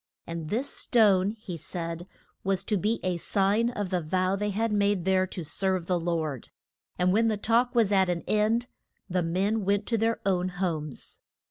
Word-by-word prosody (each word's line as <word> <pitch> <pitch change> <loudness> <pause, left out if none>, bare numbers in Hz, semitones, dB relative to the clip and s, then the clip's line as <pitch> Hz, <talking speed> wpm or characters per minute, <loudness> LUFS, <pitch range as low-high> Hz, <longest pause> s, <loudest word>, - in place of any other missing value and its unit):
And 165 -2 -5
this 250 +6 -1
stone, 200 -5 +3
he 210 -4 -7
said, 170 +1 -6 0.4
was 195 -1 +1
to 215 - 0
be 210 +4 0
a 185 -2 0
sign 200 +6 +1
of 205 -6 -4
the 180 -1 +1
vow 185 +4 0
they 210 +1 -1
had 220 +2 0
made 200 -3 +1
there 190 0 +3
to 180 -1 -6
serve 185 +2 0
the 180 0 0
Lord. 160 -6 -2 0.5
And 180 +1 +2
when 225 +2 +3
the 215 -2 +1
talk 235 +4 +2
was 225 -4 +3
at 190 -2 +3
an 175 -1 -1
end, 215 +3 +1 0.4
the 180 -1 0
men 195 +6 0
went 200 +1 +1
to 230 -2 +1
their 225 +1 +1
own 185 -2 +1
homes. 165 -6 -4
190 Hz, 190 wpm, -27 LUFS, 180-210 Hz, 0.5 s, stone